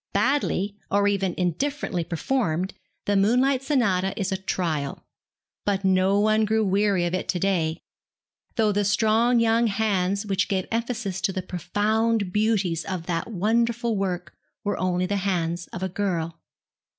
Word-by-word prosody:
Badly, 205 -3 +1
or 200 0 +3
even 195 -3 0
indifferently 185 - -1
performed, 180 0 -1 0.3
the 205 - +1
'Moonlight 250 +7 +3
Sonata' 200 -8 +1
is 195 -1 -1
a 190 - 0
trial; 165 -7 -2 0.6
but 200 -1 0
no 190 +1 +3
one 215 +1 +3
grew 220 0 +2
weary 195 -2 +2
of 175 - -2
it 185 - -2
to 180 - 0
day, 170 -4 +1 0.8
though 220 -2 +3
the 205 0 +1
strong 225 +4 +3
young 230 +1 +3
hands 200 -2 0
which 195 -1 0
gave 190 -2 -1
emphasis 230 -4 -2
to 200 - +1
the 185 -1 -4
profound 205 +3 0
beauties 205 -6 +1
of 180 -3 -4
that 170 +1 -2
wonderful 230 +3 +1
work 180 -4 -2 0.3
were 205 - -1
only 180 0 +1
the 200 +2 -1
hands 175 -3 -1
of 185 - -6
a 190 - -1
girl. 170 -4 -2
195 Hz, 150 wpm, -25 LUFS, 180-220 Hz, 0.8 s, or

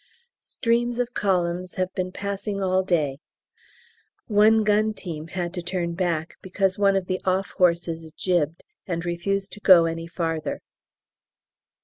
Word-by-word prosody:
Streams 240 0 0
of 245 0 -1
columns 180 -2 0
have 185 0 -1
been 185 -1 -2
passing 200 +1 -4
all 185 -1 +2
day; 155 -7 0 1.1
one 215 +1 +4
gun 215 +1 +2
team 160 -5 -6
had 175 0 -4
to 180 - -3
turn 175 -1 -2
back 170 -3 -2
because 190 +1 0
one 200 -1 +4
of 190 -1 0
the 185 0 -2
off 190 0 0
horses 170 -2 +1
jibbed 170 -3 0 0.2
and 170 -2 -3
refused 195 +3 -2
to - - -10
go 185 -5 +7
any 165 0 -3
farther. 165 -2 -3
185 Hz, 140 wpm, -24 LUFS, 170-200 Hz, 1.1 s, go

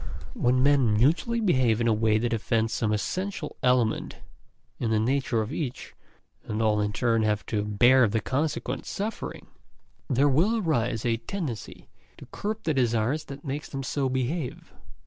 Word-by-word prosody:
When 125 +1 +2
men 140 -6 +4
mutually 170 - +2
behave 130 - +2
in 115 - +1
a 115 - +4
way 110 0 +2
that 120 +1 -1
offends 115 0 0
some 110 -2 0
essential 180 - -3
element 125 -3 +1 0.6
in 115 - -1
the 110 -1 +2
nature 120 -1 +1
of 110 +7 -6
each, 135 -7 -5 0.5
and 105 - -4
all 105 -1 +2
in 105 0 0
turn 115 0 +1
have 105 -1 0
to 105 -2 -1
bear 120 +4 +5
the 110 +2 0
consequent 135 0 -2
suffering, 215 +3 -5 0.6
there 135 +2 +3
will 170 - +3
arise 125 - 0
a 115 -1 +2
tendency 130 - -6 0.3
to - - -11
curb 215 +2 -4
the 155 - +1
desire 120 -1 +1
that 140 -2 -10
makes 145 +2 -4
them 135 -1 -5
so 135 0 -1
behave. 130 +3 -3
125 Hz, 165 wpm, -26 LUFS, 110-145 Hz, 0.6 s, bear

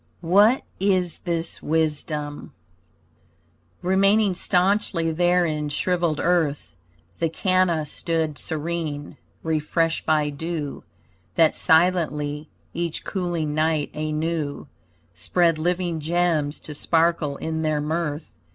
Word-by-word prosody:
WHAT 205 +9 +5 0.2
IS 185 -3 +1
THIS 170 -2 -3
WISDOM 150 -1 -2 1.3
Remaining 195 +2 +3
staunchly 180 -2 +1
there 175 +2 +3
in 150 -2 -2
shriveled 170 0 0
earth, 165 -5 0 0.4
The 165 - +1
canna 180 -2 +1
stood 160 0 -2
serene, 155 -2 -4 0.3
refreshed 160 +1 0
by 150 -1 +2
dew 155 0 -4 0.5
That 165 -2 +4
silently, 155 -3 +2 0.2
each 170 -1 -3
cooling 175 -5 -2
night 155 -1 0
anew 155 -1 -2 0.5
Spread 165 - +1
living 175 0 -1
gems 160 -2 0
to 150 - -8
sparkle 165 -1 +1
in 160 0 -3
their 155 -1 0
mirth. 150 0 -3
165 Hz, 100 wpm, -23 LUFS, 150-175 Hz, 1.3 s, WHAT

